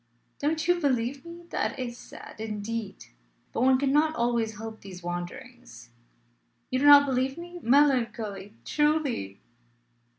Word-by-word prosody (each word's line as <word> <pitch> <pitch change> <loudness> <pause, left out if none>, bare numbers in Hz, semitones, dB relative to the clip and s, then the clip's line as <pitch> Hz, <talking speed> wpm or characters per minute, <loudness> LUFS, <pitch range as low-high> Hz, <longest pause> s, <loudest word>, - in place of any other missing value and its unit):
"Don't 315 +3 -1
you 355 0 +3
believe 265 -2 0
me? 340 +1 -10
That - - -1
is 245 -2 -4
sad, - - -12
indeed. 215 0 -5 0.5
But - - -1
one 260 +1 +5
cannot 295 +4 +2
always 235 -2 0
help 220 0 -8
these 185 -2 -10
wanderings. 175 - -7 0.8
You 255 - +1
do 290 - +3
not 285 0 +9
believe 265 +1 0
me? 350 +1 -8
Melancholy, 230 -7 +1
truly!" 295 - 0
255 Hz, 130 wpm, -27 LUFS, 220-285 Hz, 0.8 s, not